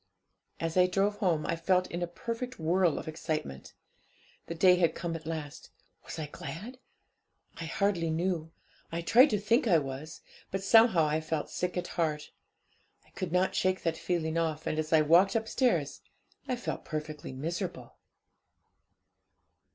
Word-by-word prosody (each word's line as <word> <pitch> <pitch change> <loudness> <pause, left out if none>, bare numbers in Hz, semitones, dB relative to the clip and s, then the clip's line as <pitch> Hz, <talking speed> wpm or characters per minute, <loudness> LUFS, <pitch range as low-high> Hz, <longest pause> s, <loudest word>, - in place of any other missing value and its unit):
As 165 +1 -2
I 180 0 +6
drove 200 +3 +1
home, 170 -7 +1
I 165 - 0
felt 180 +2 +2
in 175 - -3
a 175 - -1
perfect 230 +8 -5
whirl 170 +1 +2
of - - -6
excitement. 155 - -4 0.7
The 170 - -5
day 180 +1 +5
had 170 -3 +2
come 170 -1 -3
at 160 -1 -8
last. 155 -3 -6 0.4
Was - - -7
I 155 - -3
glad? 175 - -8 0.8
I 165 - -5
hardly 170 -1 0
knew 165 -1 -1 0.4
I 170 +1 -2
tried 250 - +6
to 210 - +1
think 230 +6 +2
I 175 -6 +5
was; 140 +1 -5 0.3
but 195 0 -3
somehow 225 -6 +6
I 155 +1 0
felt 155 -1 -3
sick 180 0 -2
at 175 - -2
heart; 155 -3 -2 0.7
I - - -26
could 185 -4 -5
not 180 +1 +2
shake 185 0 0
that 165 -1 0
feeling 165 -2 -1
off, 160 -1 -2
and 155 - -1
as 155 0 -3
I 160 -1 +6
walked 175 +7 +5
upstairs, 220 - 0 0.5
I 255 - 0
felt 245 - -5
perfectly 155 -2 -5
miserable. 160 - -5
170 Hz, 160 wpm, -30 LUFS, 155-190 Hz, 0.8 s, I